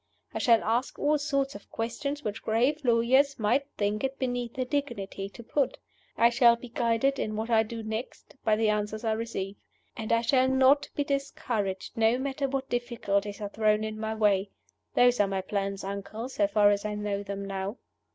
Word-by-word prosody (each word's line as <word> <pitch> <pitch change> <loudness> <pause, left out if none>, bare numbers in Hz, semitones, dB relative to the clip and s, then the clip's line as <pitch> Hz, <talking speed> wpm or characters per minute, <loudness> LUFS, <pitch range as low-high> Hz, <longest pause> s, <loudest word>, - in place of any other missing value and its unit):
I - - -2
shall 230 -2 +4
ask 235 +4 0
all 300 +1 +2
sorts 275 -2 0
of 200 - -12
questions 280 +6 -3
which 210 0 -4
grave 245 +7 +1
lawyers 255 +4 +3
might 235 +6 +1
think 210 +2 0
it 270 0 -2
beneath 245 -2 -2
their 255 -1 -1
dignity 200 -8 -3
to 235 - -12
put. 275 +3 0 0.4
I 235 +1 +5
shall 240 -1 +6
be 240 +1 -11
guided, 235 +4 +1
in 215 - -2
what 220 +2 -3
I 220 -1 +5
do 225 +1 -5
next, 220 +6 -6
by 215 -1 +3
the 220 0 +1
answers 210 +1 -1
I 225 - +1
receive. 220 -3 -3 0.4
And 220 -1 -4
I 230 0 +4
shall 255 +2 +3
not 265 +2 +4
be 290 - +1
discouraged, 235 -8 -2
no 225 +2 +4
matter 275 +1 -2
what 270 0 -2
difficulties 210 -4 -2
are 205 - -3
thrown 215 0 +2
in 215 0 -4
my 220 0 -2
way. 205 -2 +2 0.5
Those 245 0 +5
are 205 - +4
my 195 -1 -1
plans, 195 0 -3
uncle, 200 +5 -5
so 210 -6 +1
far 205 0 +4
as 200 0 0
I 210 0 -3
know 205 -1 -2
them 200 0 -5
now." 195 +3 -4
225 Hz, 195 wpm, -28 LUFS, 205-255 Hz, 0.5 s, shall